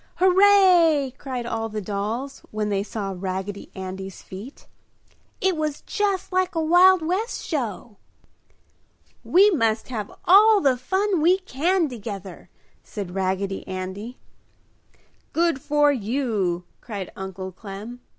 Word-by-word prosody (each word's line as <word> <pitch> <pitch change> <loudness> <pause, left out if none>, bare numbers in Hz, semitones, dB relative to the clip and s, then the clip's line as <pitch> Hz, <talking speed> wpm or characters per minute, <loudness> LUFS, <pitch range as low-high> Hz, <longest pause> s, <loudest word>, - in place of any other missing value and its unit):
"Hooray!" 360 -7 +5
cried 255 -3 -4
all 225 -1 -3
the 215 0 -4
dolls 215 +7 -4
when 215 -1 -2
they 200 -1 0
saw 200 -1 -4
Raggedy 190 +2 -5
Andy's 190 0 -7
feat. 205 +9 -10 0.7
"It 380 -2 +1
was 305 -2 -3
just 400 -3 -1
like 370 -1 +1
a - - +1
Wild 355 +2 +5
West 390 +8 -2
Show!" 235 - -4 1.3
"We 395 +4 +5
must 230 - 0
all - - -4
have 210 -1 -5
all 420 +3 +7
the 270 -6 +3
fun 380 +7 0
we 355 +4 +5
can 360 0 0
together!" 205 -7 -8 0.3
said 195 -4 -7
Raggedy 195 +1 -2
Andy. 190 +6 -6 1.2
"Good 335 -5 +1
for 295 0 +3
you!" 215 -8 -1 0.2
cried 200 -6 -6
Uncle 190 0 -6
Clem. 205 +5 -9
245 Hz, 125 wpm, -24 LUFS, -, 1.3 s, all